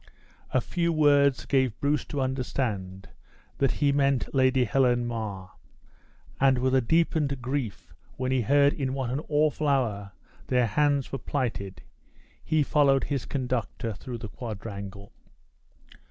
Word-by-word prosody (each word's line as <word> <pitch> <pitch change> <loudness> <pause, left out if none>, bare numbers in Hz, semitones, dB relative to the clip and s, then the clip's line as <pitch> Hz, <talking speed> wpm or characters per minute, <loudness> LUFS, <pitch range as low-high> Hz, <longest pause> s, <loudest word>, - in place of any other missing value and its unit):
A 130 - +1
few 170 +5 -1
words 145 -3 +3
gave 130 -6 +1
Bruce 145 -1 0
to 145 - -3
understand 110 -7 -3 0.5
that 135 -2 +2
he 145 -2 +2
meant 140 -2 +1
Lady 130 -1 +3
Helen 120 0 +2
Mar; 105 -5 -5 0.9
and 135 -1 +4
with 130 +1 +1
a 130 - +4
deepened 150 0 +1
grief 125 -3 -4 0.2
when 130 0 -1
he 130 -1 +2
heard 140 +4 +4
in 135 -2 -2
what 130 -3 -2
an 135 +4 -2
awful 150 0 +1
hour 105 -8 0 0.3
their 125 -2 +2
hands 145 +3 +1
were 135 - -3
plighted, 110 -9 -3 0.6
he 155 -1 +2
followed 140 -2 +3
his 140 -4 -2
conductor 125 -3 -3
through 120 +5 -7
the 115 -1 -7
quadrangle. 100 -4 -7
130 Hz, 140 wpm, -27 LUFS, 115-140 Hz, 0.9 s, and